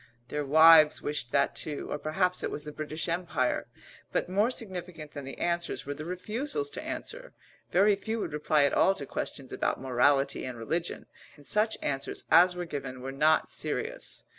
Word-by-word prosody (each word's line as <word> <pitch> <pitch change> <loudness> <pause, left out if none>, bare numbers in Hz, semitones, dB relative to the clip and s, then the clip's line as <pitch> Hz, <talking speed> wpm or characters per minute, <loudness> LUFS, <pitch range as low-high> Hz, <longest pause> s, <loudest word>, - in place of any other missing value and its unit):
Their 150 0 -2
wives 155 +1 +7
wished 145 -5 -3
that 140 - +2
too, 150 -2 -4
or 150 - -2
perhaps 180 +4 0
it - - -2
was 150 - -4
the 150 - -6
British 155 +2 -4
Empire. 170 -7 -1 0.4
But - - 0
more 205 +5 +2
significant 180 - -5
than 145 -2 -7
the 135 - -8
answers 170 0 -2
were 145 - -3
the 155 +2 -8
refusals 255 - -2
to - - -5
answer. - - -6 0.3
Very 200 +3 +4
few 220 +3 -4
would 165 - -4
reply 150 0 +2
at 140 - +2
all 195 - +4
to 140 - -6
questions 135 0 -5
about - - -1
morality 135 +2 +2
and 130 -2 -5
religion, 165 +10 -3 0.3
and 145 -2 -18
such 215 +4 +2
answers 135 -1 -3
as 180 +2 +7
were 175 0 -4
given 135 -5 -6
were 135 +1 -5
not 155 +3 +2
serious. - - -4
155 Hz, 185 wpm, -29 LUFS, 145-180 Hz, 0.4 s, wives